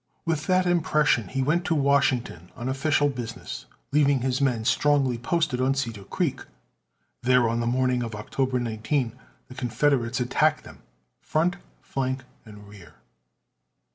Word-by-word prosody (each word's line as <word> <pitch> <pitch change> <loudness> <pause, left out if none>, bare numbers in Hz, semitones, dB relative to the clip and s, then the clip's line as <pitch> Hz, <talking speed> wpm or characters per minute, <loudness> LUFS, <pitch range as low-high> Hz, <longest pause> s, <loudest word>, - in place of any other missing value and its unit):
With 160 -2 -1
that 185 0 +3
impression, 150 -8 +2
he 135 0 -1
went 160 +6 +1
to 165 - +1
Washington 135 - +1
on 120 0 -5
official 145 +2 +2
business, 120 -4 -6 0.2
leaving 140 -2 +3
his 130 +1 0
men 120 -5 +1
strongly 130 +1 +2
posted 150 -1 0
on 135 +1 +2
Cedar 115 -7 -4
Creek. - - -1 0.8
There, 125 -1 +4
on 115 +1 0
the 115 - -1
morning 125 0 +1
of 115 -3 -4
October 130 +4 -1
19, 115 +2 -1 0.4
the - - -11
Confederates 125 -1 0
attacked 140 +5 +2
them, - - -13 0.4
front, 175 +4 0 0.3
flank, 130 0 -2 0.2
and 105 -1 -12
rear. 100 -6 -14
130 Hz, 140 wpm, -25 LUFS, 120-145 Hz, 0.8 s, There